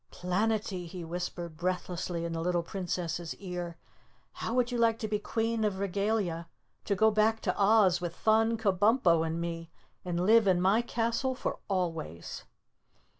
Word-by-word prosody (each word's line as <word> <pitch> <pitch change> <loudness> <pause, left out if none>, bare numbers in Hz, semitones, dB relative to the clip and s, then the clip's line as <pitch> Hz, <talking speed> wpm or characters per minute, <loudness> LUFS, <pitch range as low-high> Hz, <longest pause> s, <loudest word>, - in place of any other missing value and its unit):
"Planetty," 190 0 -1
he 175 +1 -7
whispered 175 -1 -5
breathlessly 180 -1 -2
in 170 - -3
the 165 - -2
little 175 0 0
Princess' 175 -2 -3
ear. 175 -3 -6 0.6
"How 230 - -3
would 250 -1 +2
you 240 - -1
like 230 -1 +3
to 220 - -3
be 210 -1 -1
Queen 225 +1 -1
of 205 -3 0
Regalia, 195 -3 -1 0.4
to 200 - +1
go 220 +3 +4
back 215 +1 +2
to - - 0
Oz 200 -3 +4
with 175 -1 -4
Thun, 225 +1 +3
Kabumpo 200 -3 +3
and 165 +1 -2
me 165 -1 -4 0.3
and 175 0 -1
live 220 0 +6
in 185 -2 +4
my 195 +5 +4
castle 240 +2 -1
for - - -3
always?" 165 - -3
185 Hz, 160 wpm, -30 LUFS, 175-220 Hz, 0.6 s, live